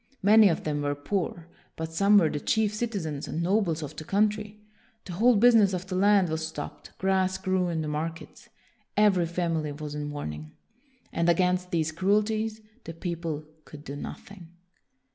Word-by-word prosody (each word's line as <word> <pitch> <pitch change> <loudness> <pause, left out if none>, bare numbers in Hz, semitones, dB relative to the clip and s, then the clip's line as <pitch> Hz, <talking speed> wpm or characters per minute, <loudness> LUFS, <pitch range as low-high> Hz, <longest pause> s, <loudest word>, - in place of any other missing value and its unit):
Many 210 +1 +7
of 165 - -1
them 150 -1 -2
were 145 0 -1
poor; 170 +2 -3 0.3
but 160 0 -5
some 200 +4 +5
were 175 -5 +5
the 150 - -2
chief 215 +5 +1
citizens 200 -11 -3
and 165 - -3
nobles 175 -4 +1
of 150 +1 -7
the 155 - -7
coun 205 +6 +3
try. 210 0 -7 0.5
The 180 - -7
whole 235 +7 +4
business 215 -3 +5
of 180 0 -3
the 185 -1 -5
land 195 -1 +4
was 160 0 -2
stopped; 150 -2 -9
grass 190 0 +1
grew 185 -1 0
in 165 -2 -2
the - - -4
markets. 160 +7 -5 0.5
Every 195 -5 +4
family 165 -3 -1
was 145 0 -7
in 150 0 -4
mourning. 75 - -6 0.6
And 170 +1 +1
against 180 +1 +2
these 160 -2 0
cruelties 215 +5 0 0.2
the 165 - -7
people 165 -3 -4 0.2
could 150 -1 -12
do 140 - -7
nothing. 180 +4 -9
175 Hz, 175 wpm, -27 LUFS, 155-200 Hz, 0.6 s, Many